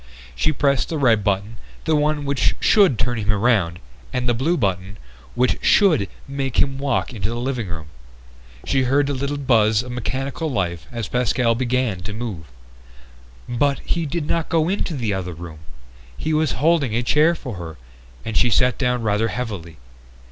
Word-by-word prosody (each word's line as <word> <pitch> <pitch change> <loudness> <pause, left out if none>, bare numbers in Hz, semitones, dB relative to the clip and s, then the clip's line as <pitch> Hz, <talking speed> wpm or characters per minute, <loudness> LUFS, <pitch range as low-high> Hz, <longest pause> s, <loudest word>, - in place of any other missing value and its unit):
She 65 - +1
pressed 140 -2 +1
the 160 - -2
red 115 -7 +3
button, 100 +3 -1 0.3
the 160 - +2
one 150 0 +1
which 140 -1 +1
should 195 - +4
turn 120 +2 -1
him 105 0 0
around, 100 -5 +2 0.3
and 125 -1 -1
the 120 - +3
blue 150 +9 +1
button, 95 -3 -2 0.4
which 125 +1 +2
should 160 - +4 0.2
make 135 -2 -3
him 135 -1 +2
walk 140 -2 -1
into 100 -3 -2
the 120 - -3
living 125 -4 -2
room. 80 -3 -6 0.8
She 135 - +2
heard 140 +3 +3
the 140 - -1
little 140 +2 -2
buzz 110 -5 +3
of 125 - -8
mechanical 135 +6 -3
life 90 - -2
as 115 -4 -4
Pascal 125 -1 +1
began 125 -4 0
to 90 +3 -6
move. 105 -8 -5 1.0
But 140 +4 +1
he 170 -2 -1
did 155 +1 -2
not 165 +1 -1
go 165 0 +2
into 185 -4 -1
the 115 -6 -1
other 90 -2 -4
room! 80 -1 -9 0.6
He 155 - -2
was 155 -2 +1
holding 150 -5 +2
a 120 - +1
chair 155 +7 +4
for 125 - -7
her, 80 -3 -7 0.5
and 115 - -4
she 125 - +4
sat 125 +2 +2
down 125 -3 0
rather 105 +1 +1
heavily. 100 -10 -5
125 Hz, 175 wpm, -21 LUFS, 105-140 Hz, 1.0 s, should